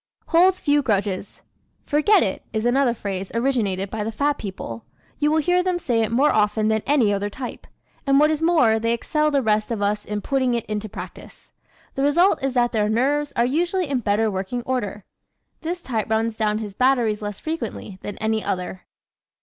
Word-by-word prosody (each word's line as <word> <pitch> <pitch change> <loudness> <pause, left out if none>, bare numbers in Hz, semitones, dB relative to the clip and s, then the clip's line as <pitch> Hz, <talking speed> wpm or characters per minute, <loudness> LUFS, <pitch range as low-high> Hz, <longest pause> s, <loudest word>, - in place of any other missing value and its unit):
Holds 365 +3 +4
Few 290 -1 +2
Grudges 200 -5 -2 0.4
¶ - - -38
"Forget 330 +8 +4
it" 190 - -2
is 220 0 -1
another 245 0 +2
phrase 195 -3 -5
originated 215 -7 0
by 220 -1 -3
the 220 - -3
fat 285 +5 0
people. 150 - -6 0.4
You 295 0 +2
will 310 - +2
hear 355 +3 +2
them 365 -1 0
say 240 -9 0
it 225 - -1
more 270 +6 +3
often 215 0 +2
than 220 0 +1
any 250 -8 +3
other 200 +1 -1
type. 250 +4 -7 0.4
And 275 0 +5
what 305 +1 +4
is 310 0 -1
more, 285 -10 +4
they 230 +1 +1
excel 300 +6 0
the 280 -3 +1
rest 215 -1 +1
of 230 -3 -2
us 205 +1 0
in 210 0 -4
putting 260 0 0
it 235 - -2
into 215 0 -4
practice. - - -10 0.4
The 270 - -3
result 295 +2 +3
is 270 -1 -1
that 240 -1 +2
their 210 -2 +1
nerves 285 +6 +1
are 235 - +3
usually 345 +6 0
in 270 -3 0
better 215 0 +1
working 195 +6 -3
order. 210 -6 -3 0.6
This 345 +2 -4
type 225 -5 -2
runs 220 0 0
down 215 -1 0
his 210 -2 -5
batteries 240 -3 +2
less 205 -2 -5
frequently 235 - -5
than 205 - -6
any 220 0 -1
other. 185 -1 -4
230 Hz, 200 wpm, -22 LUFS, 210-285 Hz, 0.6 s, And